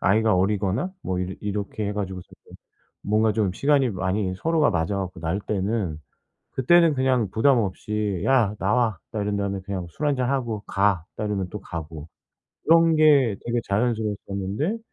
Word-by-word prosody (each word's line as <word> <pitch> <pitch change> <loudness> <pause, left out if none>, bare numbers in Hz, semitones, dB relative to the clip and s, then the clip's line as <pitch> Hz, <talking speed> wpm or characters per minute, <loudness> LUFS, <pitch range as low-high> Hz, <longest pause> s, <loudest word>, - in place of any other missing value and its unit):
아이가 110 +2 +3
어리거나 100 - 0
뭐 90 -1 -2
이러 90 +1 -3
이렇게 105 +1 -3
해 105 - -2
가지고 95 -3 -4 0.8
뭔가 110 +1 +2
좀 105 -4 0
시간이 140 +3 +2
많이 95 0 -1
서로가 160 - +2
맞아 85 +1 -1
갖고 95 -2 -5
날 85 +5 -2
때는 100 -5 -2 0.5
그때는 165 +5 +4
그냥 130 -5 +1
부담 130 +5 +4
없이 105 -1 -2
"야 120 -6 +3
나와." 110 -1 +1
딱 110 -3 -3
이런 100 0 -1
다음에 100 -1 -2
그냥 95 -2 -5
술 150 - -3
한잔 130 -3 +1
하고 120 -6 -2
"가." 100 -4 +1
딱 110 - -2
이러면 100 -3 -2
또 105 - -6
가고. 80 -3 -7 0.6
이런 165 0 +5
게 140 -8 +5
되게 120 0 0
자연스러웠었는데. 105 - -1
105 Hz, 325 characters per minute, -24 LUFS, 95-125 Hz, 0.8 s, 이런